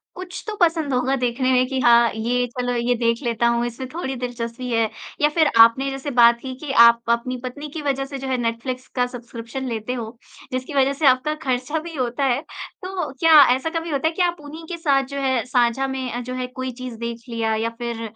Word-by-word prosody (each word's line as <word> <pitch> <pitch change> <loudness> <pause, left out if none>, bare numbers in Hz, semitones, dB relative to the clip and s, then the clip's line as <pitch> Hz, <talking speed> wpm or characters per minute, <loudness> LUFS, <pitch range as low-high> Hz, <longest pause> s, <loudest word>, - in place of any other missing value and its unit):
कुछ 370 0 -7
तो 425 - -3
पसंद 325 -5 +2
होगा 255 +2 +1
देखने 255 +1 0
में 255 0 +4
कि 265 -1 -2
हाँ 235 -1 +5
ये 245 +3 0
चलो 245 0 -1
ये 240 +1 +1
देख 230 +2 0
लेता 235 0 +1
हूँ, 235 0 +1
इसमें 250 +2 -5
थोड़ी 270 -6 -3
दिलचस्पी 245 0 -5
है। 225 -1 +2 0.3
या 295 - +5
फ़िर 310 -1 +3
आपने 260 +4 +5
जैसे 270 +1 -5
बात 235 -1 +5
की 260 -1 -6
कि 280 - -3
आप 235 -1 +7
अपनी 240 +2 0
पत्नी 290 +4 -6
की 315 - -4
वज़ह 275 -1 -1
से 275 0 -7
जो 270 - -5
है 260 -1 0
नेटफ्लिक्स 245 +3 -3
का 250 -1 +2
सब्सक्रिप्शन 240 +1 -7
लेते 230 +1 -3
हो, 230 -1 -6 0.3
जिसकी 255 +3 -4
वज़ह 275 0 +3
से 295 +1 -2
आपका 265 +4 +3
खर्चा 260 +5 -1
भी 330 +1 -8
होता 250 +1 -2
है। 265 +1 +1 0.4
तो 365 -6 -4
क्या 320 -2 +8
ऐसा 295 +5 -3
कभी 330 0 -4
होता 290 +1 0
है 325 - -1
कि 365 - -2
आप 350 -1 +1
उन्हीं 315 +3 -10
के 340 - -4
साथ 280 -5 +2
जो 280 - -2
है 260 -3 +1
साझा 250 +1 +1
में 255 -2 -4
जो 255 +1 -6
है 255 0 -3
कोई 260 0 -5
चीज़ 245 -3 -6
देख 235 0 -5
लिया। 225 -1 -1
या 225 +1 -1
फ़िर 235 -1 -4
255 Hz, 230 wpm, -22 LUFS, 235-280 Hz, 0.4 s, क्या